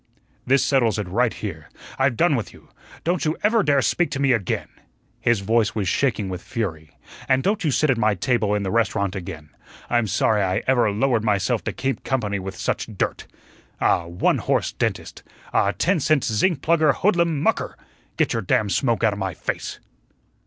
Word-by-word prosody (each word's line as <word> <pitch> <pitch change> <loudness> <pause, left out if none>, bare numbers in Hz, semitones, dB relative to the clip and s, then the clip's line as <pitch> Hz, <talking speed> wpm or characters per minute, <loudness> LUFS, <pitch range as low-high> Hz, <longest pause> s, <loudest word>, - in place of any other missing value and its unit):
"This 135 +2 +4
settles 120 -6 +2
it 105 -3 -3
right 115 +6 +1
here. 80 -8 -7 0.3
I've 135 -3 +2
done 165 -4 +3
with 115 - -4
you. - - -18 0.3
Don't 175 +1 0
you 155 +1 0
ever 220 +2 +4
dare 140 -7 +2
speak 155 - +1
to 140 -2 -4
me 140 -1 +3
again" 110 -7 -1 0.5
his 120 -4 +1
voice 110 +1 +1
was 100 -4 -1
shaking 110 -1 0
with 90 -1 -5
fury 80 -9 -5 0.3
"and 130 0 +3
don't 210 +1 0
you 155 - +1
sit 145 +1 +2
at 120 - 0
my 110 -2 +2
table 105 +1 +1
in 105 - -1
the 95 - -2
restaurant 100 -4 0
again. 85 -5 -7 0.4
I'm 120 -2 +2
sorry 105 +1 +2
I 95 +1 0
ever 120 -4 +3
lowered 115 +2 +1
myself 105 +2 +1
to - - -1
keep 135 -3 -3
company 105 -7 -1
with 95 0 -6
such - - -2
dirt. - - -2 0.5
Ah, 85 - +2
one 85 +1 +1
horse - - 0
dentist! - - -3 0.3
Ah, 100 - +3
ten 180 - +1
cent 155 -1 +2
zinc 135 - +1
plugger 155 -3 +3
hoodlum 170 -6 +2
MUCKER! - - 0 0.4
Get - - +1
your - - -1
damn 105 -2 +1
smoke 115 +4 +1
outa 105 -2 +2
my 95 -4 -3
face." - - -4
115 Hz, 190 wpm, -23 LUFS, 100-140 Hz, 0.5 s, This